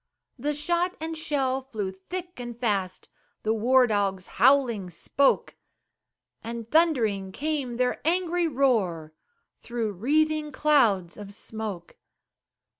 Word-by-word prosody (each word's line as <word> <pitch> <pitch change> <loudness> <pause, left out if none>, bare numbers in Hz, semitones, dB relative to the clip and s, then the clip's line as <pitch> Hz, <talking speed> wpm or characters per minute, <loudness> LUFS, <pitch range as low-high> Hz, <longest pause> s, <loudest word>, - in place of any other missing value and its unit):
The 295 +4 -1
shot 345 +4 0
and 320 +1 -4
shell 275 -5 -1
flew 220 -7 -4
thick 350 - -8
and 240 -1 -7
fast, 200 -6 -1 0.4
The 220 - +1
war 250 +4 +4
dogs 200 -4 0 0.2
howling 240 -7 +4
spoke, 270 - +1 0.9
And 230 0 -6
thundering 230 - +2
came 275 -1 -3
their 250 0 0
angry 350 +1 +1
roar, 210 - +1 0.5
Through 235 -3 -3
wreathing 300 - +1
clouds 230 - +2
of 205 -1 -9
smoke. 215 -6 -7
245 Hz, 115 wpm, -26 LUFS, 205-300 Hz, 0.9 s, war